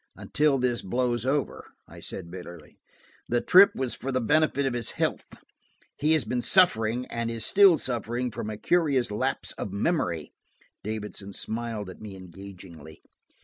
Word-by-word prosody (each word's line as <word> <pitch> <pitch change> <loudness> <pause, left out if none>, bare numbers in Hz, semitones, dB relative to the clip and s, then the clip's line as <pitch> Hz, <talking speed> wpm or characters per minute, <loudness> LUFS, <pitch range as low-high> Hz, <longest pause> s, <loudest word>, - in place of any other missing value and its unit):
"Until 150 0 +1
all - - +2
this 125 -2 0
blows 120 +3 -1
over," 140 +1 -2
I - - -13
said 85 -3 -6
bitterly. 85 -4 -11 0.5
"The 120 - +2
trip 190 +9 +6
was 130 -2 -2
for 135 - -5
the 130 - +1
benefit 140 +3 +2
of 135 - 0
his 120 -2 0
health. - - -1 0.7
He 150 +2 +2
has 155 -4 +2
been 125 -1 -1
suffering–and 115 - +2
is 115 -1 -3
still 195 -4 +6
suffering, 120 -1 -2
from 105 - -5
a 105 - -5
curious 140 -6 +1
lapse 130 +6 -1
of 100 - -4
memory." 100 - -1 0.5
Davidson 105 -2 -6
smiled 110 -1 -4
at 95 - -11
me 105 -2 -8
engagingly. 90 -4 -12
120 Hz, 155 wpm, -26 LUFS, 100-135 Hz, 0.7 s, trip